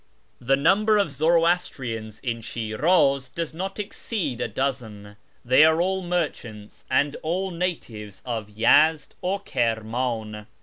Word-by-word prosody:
The 130 +3 +2
number 205 +9 +3
of 200 -7 +1
Zoroastrians 145 - 0
in 115 -2 -3
Shiniz 135 +5 +1
does 165 +1 -5
not 190 +4 -5
exceed 195 - -3
a - - 0
dozen. 110 -7 -4 0.3
They 130 +5 +6
are 160 +1 +4
all 190 +2 0
merchants, 150 - -4
and 145 +2 +1
all 185 +4 -2
natives 125 - -5
of 115 -4 -4
Yezd 150 +9 +3
or 190 +2 -1
Kirm; 115 - -1
in. 110 -4 -3
140 Hz, 130 wpm, -24 LUFS, 115-175 Hz, 0.3 s, They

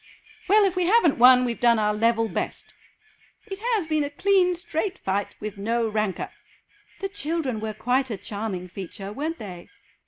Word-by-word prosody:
"Well, 415 +2 +5
if 380 -2 0
we 360 -1 +1
haven't 375 - +4
won; 250 +1 +7
we've 235 -2 -3
done 235 -1 +4
our 210 -1 +1
level 225 +1 +2
best." - - -4 0.7
"It 390 -3 -7
has 450 -5 0
been 310 -1 0
a 285 - -3
clean 365 +3 +2
straight 350 +3 -3
fight, 195 +1 -2
with 210 -1 -6
no 230 +3 0
rancour." 215 -3 -2 0.7
"The 390 - -1
children 320 - -2
were 215 0 -4
quite 255 +4 0
a 215 - -3
charming 200 -2 -5
feature, 195 +2 -8
weren't 315 +7 -3
they?" 180 -5 -9
245 Hz, 175 wpm, -25 LUFS, 215-345 Hz, 0.7 s, won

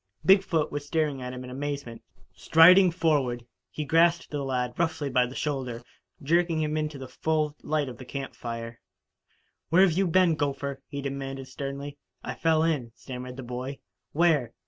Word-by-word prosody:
Big 195 0 +7
foot 165 -5 -1
was 145 0 -3
staring 145 -2 -1
at 125 0 -5
him 125 0 -7
in 125 - -8
amazement. 140 -3 -5 0.3
Striding 180 +4 +7
forward, 145 -8 0 0.2
he 150 - -5
grasped 170 +3 +3
the 145 -2 -2
lad 125 -2 -1
roughly 160 -4 -1
by 125 0 +3
the 125 - -10
shoulder, 130 -5 -3 0.4
jerking 170 +2 +2
him 155 -1 -1
into 155 -1 -2
the 135 -1 -8
full 155 +2 -1
light 150 -2 -1
of 120 -2 -8
the - - -8
camp 135 +1 -6
fire. 115 0 -7 0.9
"Where 180 +5 +6
you 190 +1 +1
been, 175 0 +4
gopher?" 140 -2 -3
he 140 -1 -6
demanded 135 -1 -5
sternly. 140 +1 -6 0.2
"I - - -4
fell 160 -1 +2
in," 145 -8 0
stammered 125 -1 -8
the 135 - -6
boy. 125 +3 -5 0.3
"Where?" 150 -7 +2
145 Hz, 170 wpm, -27 LUFS, 130-160 Hz, 0.9 s, Big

